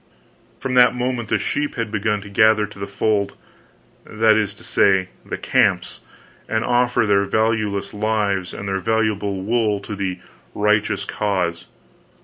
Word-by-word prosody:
From 130 Hz, 0 st, -3 dB
that 125 Hz, 0 st, +5 dB
moment 125 Hz, -2 st, -2 dB
the -, -, +2 dB
sheep 145 Hz, 0 st, -2 dB
had 115 Hz, -2 st, -3 dB
begun 105 Hz, -1 st, -1 dB
to 100 Hz, -, -10 dB
gather 110 Hz, 0 st, +4 dB
to 105 Hz, -1 st, -13 dB
the 100 Hz, -, -4 dB
fold 100 Hz, 0 st, 0 dB, 0.7 s
that 110 Hz, 0 st, +2 dB
is 105 Hz, -2 st, 0 dB
to -, -, -13 dB
say, 95 Hz, -2 st, +2 dB
the -, -, -5 dB
camps -, -, +1 dB, 0.5 s
and 110 Hz, 0 st, 0 dB
offer 120 Hz, -1 st, +2 dB
their 100 Hz, -1 st, +3 dB
valueless 105 Hz, -1 st, 0 dB
lives 105 Hz, -3 st, -1 dB
and 100 Hz, -, -7 dB
their 95 Hz, 0 st, -1 dB
valuable 105 Hz, -2 st, -1 dB
wool 110 Hz, -1 st, +1 dB
to 105 Hz, +1 st, -6 dB
the 95 Hz, -2 st, -3 dB, 0.4 s
"righteous 105 Hz, 0 st, +1 dB
cause." 90 Hz, -5 st, -2 dB
105 Hz, 150 wpm, -21 LUFS, 100-110 Hz, 0.7 s, that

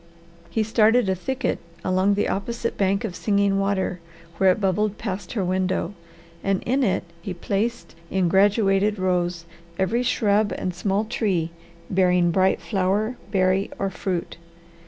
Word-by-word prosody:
He 215 Hz, +6 st, 0 dB
started 220 Hz, +1 st, +3 dB
a -, -, +3 dB
thicket 265 Hz, +8 st, -2 dB, 0.3 s
along 185 Hz, +2 st, +2 dB
the 205 Hz, -, +1 dB
opposite 230 Hz, +4 st, -2 dB
bank 195 Hz, +2 st, +1 dB
of 200 Hz, -6 st, -4 dB
Singing 200 Hz, -1 st, +1 dB
Water 195 Hz, -2 st, 0 dB, 0.4 s
where 190 Hz, +1 st, +5 dB
it 185 Hz, -, -1 dB
bubbled 205 Hz, +1 st, 0 dB
past 195 Hz, -4 st, -5 dB
her 200 Hz, -6 st, -1 dB
window, 185 Hz, 0 st, 0 dB, 0.5 s
and 195 Hz, -1 st, 0 dB
in 260 Hz, +4 st, +1 dB
it 195 Hz, -6 st, +1 dB, 0.2 s
he 180 Hz, +1 st, -5 dB
placed 210 Hz, +7 st, -2 dB, 0.2 s
in 190 Hz, -2 st, +1 dB
graduated 200 Hz, +2 st, +3 dB
rows 180 Hz, -2 st, 0 dB, 0.3 s
every 215 Hz, +6 st, +1 dB
shrub 210 Hz, -4 st, +2 dB
and 185 Hz, -, -2 dB
small 195 Hz, +4 st, 0 dB
tree 190 Hz, -7 st, -1 dB, 0.4 s
bearing 180 Hz, -2 st, +3 dB
bright 190 Hz, +2 st, +2 dB
flower, 205 Hz, +4 st, 0 dB
berry, 190 Hz, 0 st, +2 dB
or 195 Hz, -1 st, -1 dB
fruit. 180 Hz, -3 st, -3 dB
195 Hz, 145 wpm, -24 LUFS, 185-210 Hz, 0.5 s, where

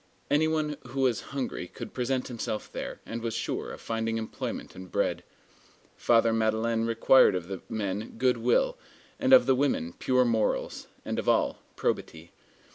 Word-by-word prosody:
Any 150 Hz, +2 st, +4 dB
one 155 Hz, -2 st, -1 dB
who 135 Hz, +2 st, -3 dB
was 120 Hz, -7 st, +2 dB
hungry 130 Hz, -9 st, -4 dB
could -, -, -9 dB
present 125 Hz, 0 st, -1 dB
himself 115 Hz, -3 st, -4 dB
there, -, -, -6 dB
and 115 Hz, 0 st, -5 dB
was 115 Hz, -1 st, -3 dB
sure 115 Hz, -, -3 dB
of -, -, -9 dB
finding 115 Hz, 0 st, -2 dB
employment 110 Hz, -1 st, -5 dB
and 95 Hz, -1 st, -10 dB
bread. -, -, 0 dB, 0.7 s
Father 115 Hz, -1 st, +3 dB
Madeleine 115 Hz, +1 st, +1 dB
required 115 Hz, 0 st, +5 dB
of 90 Hz, -1 st, -3 dB
the 95 Hz, -2 st, -6 dB
men 105 Hz, 0 st, -3 dB
good 125 Hz, +1 st, +2 dB
will, -, -, +2 dB, 0.4 s
of 260 Hz, -2 st, +6 dB
the 135 Hz, -, +4 dB
women 125 Hz, -, 0 dB
pure 125 Hz, -1 st, +2 dB
morals, 115 Hz, -2 st, 0 dB, 0.2 s
and -, -, -2 dB
of -, -, -1 dB
all, -, -, +2 dB, 0.2 s
probity. 80 Hz, +1 st, -3 dB
115 Hz, 160 wpm, -28 LUFS, 110-135 Hz, 0.7 s, of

